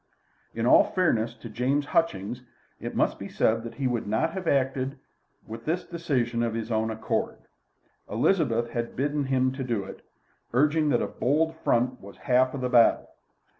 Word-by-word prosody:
In 115 0 -1
all - - +7
fairness 120 -11 0
to 120 - -10
James 125 +6 0
Hutchings, 125 - -1 0.4
it - - -6
must - - +1
be - - -6
said 115 +1 +1
that 115 0 -8
he 135 - -3
would 120 -4 -1
not 110 +10 +1
have 185 -3 -5
acted 135 0 0 0.5
with 115 +1 -9
this 170 +3 -1
decision 130 -9 -1
of 115 -1 -1
his 115 0 -4
own 110 0 +1
accord. 110 0 -2 0.7
Elizabeth 120 - +1
had 120 -1 -3
bidden 145 +2 -1
him 130 -1 +1
to 125 -6 -2
it, 95 - -10 0.5
urging 150 +4 +3
that 120 - +2
a - - -1
bold 160 +5 0
front 125 -4 0
was 100 +1 -12
half 130 +1 +2
the 125 - -1
battle. 120 -2 +4
125 Hz, 170 wpm, -26 LUFS, 115-145 Hz, 0.7 s, all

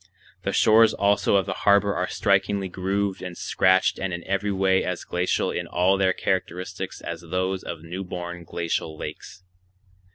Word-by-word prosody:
The 100 - -2
shores 110 +2 +5
also 100 0 +2
of 95 - +3
the 95 - -2
harbor 100 0 +4
are 90 - -1
strikingly 100 -1 +1
grooved 95 +2 -2
and 90 -1 -7
scratched 95 0 +2
and 95 -1 -2
in 85 0 -5
every 100 +2 -1
way 95 -1 +2
as 90 -1 -3
glacial 90 +1 0
in - - -3
all 90 +2 +2
their 95 -1 +2
characteristics 90 -1 -3
as 85 -1 -6
those 95 +2 -2
of 85 -2 -7
new 90 +3 -5
born 90 -1 -6
glacial 85 -2 -3
lakes. 95 - -8
95 Hz, 165 wpm, -24 LUFS, 90-100 Hz, -, shores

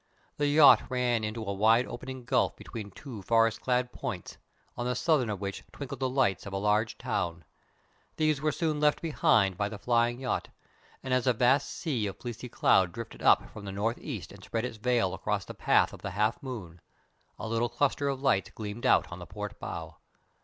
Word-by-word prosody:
The 145 - +1
yacht 145 0 +7
ran 125 -3 +1
into 110 +1 -3
a 100 - -2
wide 110 +5 +4
opening 130 +1 -7
gulf 125 0 +2
between 110 -3 -8
two 115 +1 -9
forest 115 +2 +2
clad 125 -1 0
points, 110 -10 -6 0.4
on 120 - -3
the 125 - 0
southern 135 -4 +2
of 105 -3 -3
which 100 0 -5
twinkled 140 -1 -7
the 130 -1 0
lights 125 -8 +1
of 100 - -7
a - - -1
large 105 +2 +1
town. 85 -2 -3 0.7
These 155 -3 +1
were 155 0 +2
soon 155 -1 -1
left 150 0 +3
behind 105 - +2
by 100 +1 0
the 110 - -7
flying 120 +2 +1
yacht, 130 -1 -2 0.6
and 130 - -2
as 130 0 +1
a 125 - +5
vast 130 +4 +3
sea 125 -10 -2
of 95 - -6
fleecy 120 0 -7
cloud 95 -5 +3
drifted 115 0 -8
up - - +4
from 110 - -10
the 100 - -5
north 105 +4 -1
east - - -6
and - - -13
spread 115 +1 -2
its 120 -3 -6
veil 115 -4 +1
across 95 - -2
the - - -8
path - - +3
of - - -11
the - - -4
half 105 +4 0
moon, 95 -11 -7 0.6
a - - -5
little 115 +2 0
cluster 145 +1 0
of 135 0 -3
lights 95 -8 +2
gleamed 110 +1 -4
out - - +4
on - - -7
the - - -9
port - - -7
bow. - - -6
120 Hz, 205 wpm, -29 LUFS, 105-130 Hz, 0.7 s, yacht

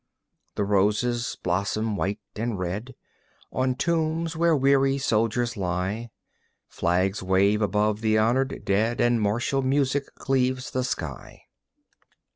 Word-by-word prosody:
The 105 - 0
roses 105 +4 +1
blossom 100 +4 -1
white 100 +1 -1 0.2
and 115 0 -2
red 95 +8 -4 0.6
On 130 0 0
tombs 160 +2 0
where 165 0 +3
weary 135 0 +3
soldiers 115 -1 0
lie; 95 +4 -2 0.6
Flags 95 +3 0
wave 95 +3 +2
above 105 +1 +1
the 110 -1 +2
honored 125 +5 +1
dead 110 +4 +1
And 120 -1 +3
martial 120 +6 0
music 135 +1 0
cleaves 130 -1 0
the 130 - -1
sky. 80 - -5
115 Hz, 115 wpm, -25 LUFS, 100-130 Hz, 0.6 s, where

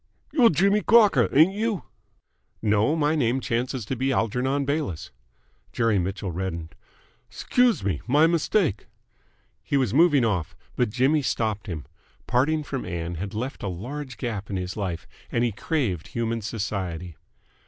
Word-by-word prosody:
"You're 250 -7 +6
Jimmy 200 +6 +3
Crocker, 205 - +5
ain't 160 +7 +5
you?" 215 -1 -1 0.8
"No. 110 +7 +2
My 150 -1 +2
name 130 -3 +1
chances 125 -1 -2
to 130 - -3
be 130 +2 0
Algernon 130 +4 0
Bayliss." 115 - -2 0.6
Jerry 115 -4 +2
Mitchell 95 +1 -3
reddened. 85 -2 -4 0.6
"'Scuse 245 - +1
me. 95 -7 -1
My 145 +5 +5
mistake." 165 - +1 0.7
He 140 - 0
was 130 -6 +1
moving 145 -4 +5
off, 95 -7 -1 0.2
but 125 -3 +1
Jimmy 130 +7 +2
stopped 110 -4 -1
him. 80 -7 -5 0.4
Parting 150 +5 +1
from 135 -3 -4
Ann 85 -1 -4
had 100 +1 -5
left 125 +5 -4
a - - -3
large 125 +9 -6
gap 110 -6 -4
in 100 - -3
his 90 0 -4
life, 95 -5 -3 0.3
and 120 - +1
he 120 - +1
craved 105 - -2
human 115 -1 -2
society. 95 -6 -4
120 Hz, 150 wpm, -25 LUFS, 100-145 Hz, 0.8 s, You're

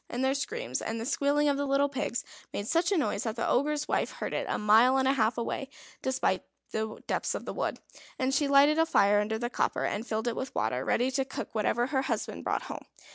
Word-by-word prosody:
And 245 +2 -2
their 265 - +3
screams, 435 - -3
and 225 +1 -3
the 225 - -4
squealing 285 +2 +2
of 285 -1 +2
the 285 0 -1
little 275 +1 +3
pigs 260 -3 -2 0.3
made 205 - -4
such 335 - +2
a 395 - +3
noise 300 - 0
that 225 -3 -3
the 230 - -1
Ogre's 295 +3 +1
wife - - 0
heard - - -4
it - - -2
a - - 0
mile 225 +5 +5
and 265 0 +2
a 270 - +4
half 225 -3 +1
away 250 +3 -3 0.3
in 265 0 +1 0.3
the 220 0 -4
depths - - -1
of - - -5
the - - -4
wood; - - -2 0.4
and 260 +1 0
she 285 +1 +2
lighted 285 +3 +5
a 325 - +4
fire 205 -8 +4
under 215 +1 -1
the 240 +2 -2
copper, - - 0
and 220 +4 -2
filled 220 +2 -2
it 235 - 0
with 260 - -5
water, 125 0 0
ready 250 - +1
to 270 +1 +1
cook 270 - -6
whatever 225 +2 +1
her 265 0 0
husband - - -3
brought - - -1
home. - - -8
265 Hz, 240 wpm, -29 LUFS, 225-280 Hz, 0.4 s, mile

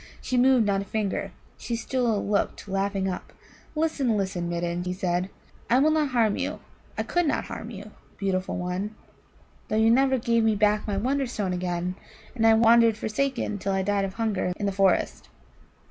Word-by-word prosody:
She 255 - -3
moved 250 -2 +5
not 200 -1 +1
a - - -6
finger; 210 -1 -2 0.3
she 235 - -3
still 230 -2 -1
looked 205 0 -1
laughing 195 0 -1
up. 185 - -5 0.4
"Listen, 295 -8 +1
listen, 185 -3 -2
Midden," 175 0 -2
he 180 - -2
said: 180 -1 -1 0.4
"I 240 - +5
will 300 +4 +4
not 310 -1 +2
harm 230 -5 +2
you - - -3 0.4
I - - 0
could 350 -2 0
not - - 0
harm 220 - -7
you, 210 -2 -9 0.3
beautiful 190 -1 -1
one, 180 +4 -3 0.7
though - - -2
you 220 +1 +5
never 265 +2 +4
gave 230 -1 +1
me 220 -1 +3
back 210 +1 +2
my 200 -2 -1
Wonderstone 240 -5 -1
again, 180 0 -2 0.4
and 225 -3 +2
I 225 - +7
wandered 230 0 +5
forsaken 220 -1 -2
till 195 +1 -1
I 190 0 0
died 200 0 +1
of 190 0 -6
hunger 210 -5 -1
in 205 - -3
the 200 - +1
forest. 190 - +1
210 Hz, 180 wpm, -26 LUFS, 190-235 Hz, 0.7 s, I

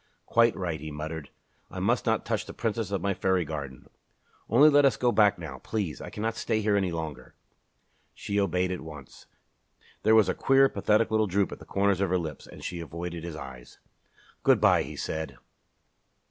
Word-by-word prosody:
"Quite 115 0 +3
right," 85 -4 -3
he 80 +2 -7
muttered. 75 -1 -6 0.4
"I - - -7
must - - +1
not - - +1
touch - - -2
the - - -9
Princess 115 -2 -2
of 100 -3 -2
my 100 0 +1
fairy 95 -2 +1
garden. 70 -4 -6 0.6
Only 130 +7 +7
let 145 -1 +6
us 135 - +3
go 125 -1 +2
back 105 -3 +4
now, 85 -2 -8
please. 95 -11 -3
I - - -7
cannot 110 +2 -2
stay 110 -2 -1
here 105 -1 +1
any 95 -3 +1
longer." 80 -4 -6 0.8
She 100 0 -2
obeyed 90 -1 +1
at 90 - -4
once. 75 -4 -11 0.7
There 110 +1 +4
was 110 -4 +6
a 95 - +1
queer, 135 0 +4
pathetic 110 -1 +1
little 110 -1 +2
droop 100 +1 +1
at - - -8
the - - -13
corners 100 -1 +1
of 100 - +1
her 90 - +2
lips, 80 -5 -6
and - - -12
she 90 - -4
avoided 85 +1 -6
his 85 -2 -6
eyes. 65 -5 -10 0.6
"Good - - +4
bye!" - - +5
he - - -6
said. 80 0 -4
95 Hz, 195 wpm, -27 LUFS, 80-110 Hz, 0.8 s, Only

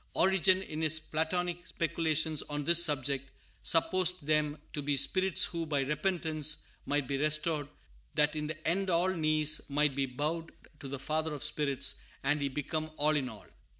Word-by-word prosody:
Origen, 190 0 +3
in 155 -3 -6
his 160 0 +3
Platonic 175 +3 -2
speculations 160 -2 0
on 145 0 -3
this 170 +3 +8
subject, 140 -3 0 0.3
supposed 180 0 +2
them 150 0 +1 0.2
to 145 - -3
be 140 0 0
spirits 185 +7 +4
who, 170 -1 -3
by 145 -2 0
repentance, 155 0 -1 0.2
might 145 -2 0
be 140 - -2
restored, 155 0 0 0.5
that 150 +1 +3
in 150 0 -3
the 155 0 -5
end 190 +3 +1
all 175 +1 +2
knees 155 -3 +1
might 145 -1 +1
be 135 -1 0
bowed 155 +6 -3 0.3
to 140 - -8
the 140 +1 -5
Father 155 +2 -2
of 140 - -6
spirits, 140 -2 0 0.2
and 145 +2 +1
He 140 - 0
become 155 +3 -3
all 155 +1 +2
in 135 -4 -1
all. 110 -4 -12
155 Hz, 170 wpm, -31 LUFS, 145-165 Hz, 0.5 s, this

